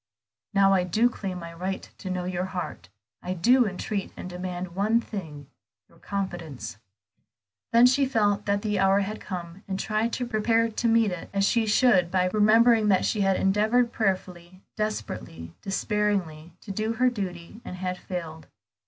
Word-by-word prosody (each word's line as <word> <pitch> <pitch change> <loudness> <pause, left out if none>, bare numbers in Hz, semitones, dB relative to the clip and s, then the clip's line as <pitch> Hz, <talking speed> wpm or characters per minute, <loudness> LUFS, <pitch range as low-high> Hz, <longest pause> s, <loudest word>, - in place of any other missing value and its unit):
"Now 195 -2 +4
I 185 -2 +3
do 220 +7 +2
claim 190 -5 -5
my 170 -1 -8
right 185 +3 -4
to 190 - -6
know 180 -1 -2
your 180 0 -2
heart; 180 - -6 0.3
I 180 +1 -3
do 245 +7 +4
entreat 195 +1 -4
and - - -6
demand 180 0 -5
one 210 +5 +2
thing, 160 -11 -7 0.4
your - - -23
confidence." 175 - -5 0.9
Then 235 +1 +7
she 265 +2 +4
felt 205 -5 +1
that 200 0 +1
the 210 -2 0
hour 195 +1 +4
had 210 +2 -4
come, 175 0 -7
and 190 -1 -3
tried 215 +3 0
to 250 - -1
prepare 230 0 +1
to 235 +2 -1
meet 225 -3 +3
it 180 -2 -6
as 195 0 +3
she 225 0 +2
should 205 -5 +4
by 185 0 +1
remembering 220 +1 +5
that 190 -3 +3
she 215 - 0
had 195 -1 +3
endeavored 220 +5 +2
prayerfully, 185 -3 -3
desperately, 85 - -4
despairingly, 195 -6 -1
to 200 - -7
do 215 +3 -1
her 250 +2 +2
duty, 190 -1 -6
and 180 - -7
had 185 0 -4
failed. 165 -3 -6
195 Hz, 170 wpm, -26 LUFS, 180-220 Hz, 0.9 s, Then